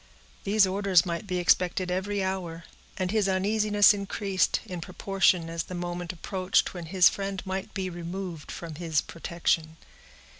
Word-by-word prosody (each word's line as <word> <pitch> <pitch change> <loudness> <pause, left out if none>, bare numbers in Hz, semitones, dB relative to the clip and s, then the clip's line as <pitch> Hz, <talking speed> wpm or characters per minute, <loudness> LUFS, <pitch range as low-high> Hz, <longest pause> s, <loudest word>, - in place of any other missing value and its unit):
These 205 0 +4
orders 190 -2 +3
might 170 +3 -4
be 180 -1 -1
expected 180 +1 +2
every 195 +2 -1
hour, 175 -3 -3 0.3
and 185 -1 -1
his 210 -3 +2
uneasiness 205 +2 +4
increased, 200 -1 0
in 180 -2 -6
proportion 185 -1 +1
as 165 0 -3
the 180 - -7
moment 175 0 -4
approached 185 +1 0
when 175 -3 -7
his 180 +1 +5
friend 195 -1 -2
might 190 +2 -4
be 190 -2 -2
removed 175 -1 -6
from 165 -2 -7
his 160 -3 +1
protection. 165 -1 -2
185 Hz, 150 wpm, -27 LUFS, 175-195 Hz, 0.3 s, his